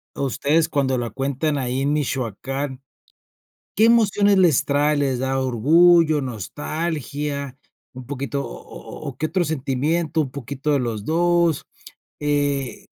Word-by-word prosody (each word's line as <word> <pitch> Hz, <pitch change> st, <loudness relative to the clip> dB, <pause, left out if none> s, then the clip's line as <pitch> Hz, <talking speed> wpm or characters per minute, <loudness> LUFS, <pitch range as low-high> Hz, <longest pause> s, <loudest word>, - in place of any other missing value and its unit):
ustedes, 145 Hz, +4 st, +1 dB
cuando 140 Hz, -5 st, 0 dB
la 120 Hz, -2 st, -3 dB
cuentan 140 Hz, +4 st, -1 dB
ahí 130 Hz, +1 st, -2 dB
en 145 Hz, +1 st, +1 dB
Michoacán?, 135 Hz, 0 st, -3 dB, 0.9 s
¿qué 215 Hz, -, +3 dB
emociones 205 Hz, -3 st, +4 dB
les 170 Hz, -8 st, +4 dB
trae?, 145 Hz, +1 st, +2 dB
¿les 135 Hz, -3 st, 0 dB
da 130 Hz, +1 st, -1 dB
orgullo, 155 Hz, +6 st, +4 dB
nostalgia, 140 Hz, -, -4 dB, 0.3 s
un 130 Hz, -1 st, -10 dB
poquito 140 Hz, 0 st, -3 dB
o -, -, -7 dB
o -, -, -12 dB, 0.3 s
o -, -, -1 dB
o 130 Hz, -, -11 dB
qué 155 Hz, -, -1 dB
otro 180 Hz, +2 st, 0 dB
sentimiento, 155 Hz, +2 st, -1 dB
un 135 Hz, -4 st, -4 dB
poquito 140 Hz, +2 st, -4 dB
de 145 Hz, -, +3 dB
los 115 Hz, -4 st, -3 dB
2? 170 Hz, +1 st, +1 dB, 0.5 s
Eh 145 Hz, -3 st, -1 dB
140 Hz, 140 wpm, -22 LUFS, 130-160 Hz, 0.9 s, emociones